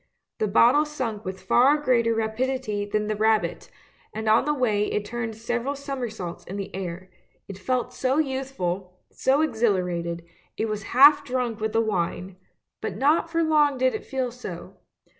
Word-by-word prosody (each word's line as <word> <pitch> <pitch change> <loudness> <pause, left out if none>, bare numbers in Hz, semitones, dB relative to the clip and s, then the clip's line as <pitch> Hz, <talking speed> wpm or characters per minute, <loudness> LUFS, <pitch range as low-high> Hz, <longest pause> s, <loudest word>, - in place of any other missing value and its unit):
The 215 - +1
bottle 240 +8 +5
sank 255 -9 -4
with 185 0 -6
far 255 +9 +4
greater 235 -5 +2
rapidity 225 -1 -1
than 210 +1 -1
the 215 0 -1
rabbit, 220 0 +1 0.5
and 220 0 -4
on 215 +1 +4
the 300 - +1
way 215 -6 +1
it 210 - -1
turned 225 0 -4
several 240 +4 -2
somersaults 245 - -5
in 195 - -6
the 200 -1 -6
air; 185 0 -6 0.4
it 195 -1 -8
felt 250 0 -1
so 265 +2 0
youthful, 255 - -2
so 270 +3 +2
exhilarated 180 - 0 0.2
— - - -38
it 220 - 0
was 215 -1 -3 0.2
half 290 +2 +8
drunk 250 -4 -2
with 220 0 -2
the 225 - +3
wine 185 -3 -2 0.2
— - - -60
but - - -4
not 305 +4 +2
for 330 0 +1
long 300 -3 +3
did 255 0 +2
it - - -4
feel 260 -2 -3
so. 245 +1 -9
230 Hz, 175 wpm, -25 LUFS, 205-265 Hz, 0.5 s, half